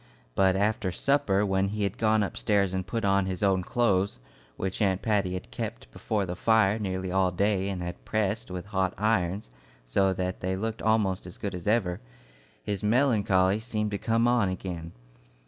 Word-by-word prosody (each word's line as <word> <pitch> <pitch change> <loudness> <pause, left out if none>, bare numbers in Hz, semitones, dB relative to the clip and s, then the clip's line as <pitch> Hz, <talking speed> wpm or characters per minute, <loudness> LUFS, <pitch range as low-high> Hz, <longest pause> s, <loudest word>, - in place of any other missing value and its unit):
But 95 +6 +3
after 105 -1 0
supper, 105 -2 +2
when 95 0 +1
he 105 +1 -2
had 100 +4 -2
gone 110 -1 +3
upstairs 100 -1 0
and 95 0 -2
put 115 -1 -2
on 100 -1 +2
his 95 +1 -3
own 95 -2 +3
clothes, 100 -3 +1 0.4
which 95 +3 -3
Aunt 95 -2 +1
Patty 100 -4 +1
had 90 - -7
kept - - -6
before 105 - -2
the 90 -1 -4
fire 110 +1 +3
nearly 95 -2 -3
all 95 0 +3
day 100 +1 0
and 90 -3 -3
had 85 0 -6
pressed 110 0 -1
with 90 0 -5
hot 95 -2 -1
irons 95 - 0 0.3
so 95 +11 +2
that 90 0 -3
they 95 +1 -1
looked 110 +3 -3
almost 105 -5 +1
as 90 - -10
good 100 -2 -4
as 90 0 -6
ever, 100 -5 +1 0.6
his 100 +6 -3
melancholy 105 -5 +3
seemed 110 -2 -2
to 100 - -2
come 115 +1 +2
on 120 -5 +3
again. 85 -3 -5
100 Hz, 180 wpm, -27 LUFS, 95-110 Hz, 0.6 s, But